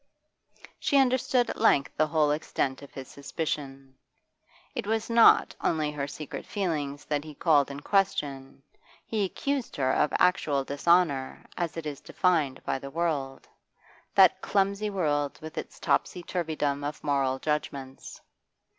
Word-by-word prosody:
She 285 - +2
understood 255 -1 +2
at - - -7
length 140 -11 +3
the 155 - +2
whole 155 -2 +2
extent 140 -3 -2
of 140 - -12
his 135 -1 -8
suspicion. 135 -2 -5 0.7
It - - -4
was 225 +1 -1
not 230 0 +6
only 155 -2 +1
her 145 -1 -3
secret 145 0 -7
feelings 150 -8 -3
that 145 -1 -1
he 155 -1 -10
called 145 -4 +3
in 140 0 -7
question, 140 -9 -1 0.4
he 215 -2 -1
accused 275 +7 -2
her 130 -2 +1
of 150 - +2
actual 150 -6 +2
dishonour 145 -1 +1
as 170 -2 -3
it 165 - -5
is 145 -2 -5
defined 160 -7 0
by - - -1
the 140 - -8
world 145 -4 -2 0.7
that - - +6
clumsy 200 +1 0
world 145 -7 -1
with 155 0 -9
its - - -7
topsy 180 - 0
turvydom 155 -5 -2
of 145 0 -5
moral 135 -2 +1
judgments. 140 -2 -4
150 Hz, 145 wpm, -28 LUFS, 140-180 Hz, 0.7 s, not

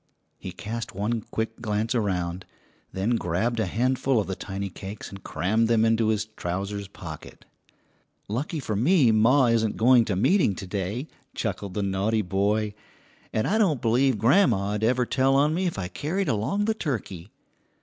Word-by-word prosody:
He - - -6
cast 110 -1 -6
one 110 +4 -1
quick 110 +1 -3
glance 110 0 -1
around, 90 -5 -2 0.4
then 110 +5 0
grabbed 110 +6 -1
a 110 - 0
handful 125 +4 +1
of 105 - 0
the 95 - -4
tiny 100 +1 -5
cakes 100 +3 -8
and 100 0 -11
crammed 110 +5 0
them 115 -1 +3
into 115 0 +2
his 105 -1 +1
trousers' 100 0 -4
pocket. 80 -5 -10 0.8
"Lucky 145 - -3
for 110 -6 -3
me 130 - +4
ma 120 +5 +4
isn't 115 -2 +1
going 120 0 +5
to 105 - -1
meeting 110 - +3
to 95 - -7
day," 100 - -3 0.3
chuckled 100 -3 -3
the 105 - 0
naughty 100 +3 0
boy, 100 +3 0 0.6
"and 110 - 0
I 215 +3 +1
don't 170 - +2
believe 125 +2 +2
grandma'd 110 - +3
ever 125 +2 +2
tell 135 +2 +2
on 145 +3 +3
me 185 +3 0
if 170 - -3
I 90 -3 -3
carried 175 - -2
along 130 - 0
the 220 - +2
turkey!" 110 - -4
110 Hz, 170 wpm, -25 LUFS, 100-125 Hz, 0.8 s, going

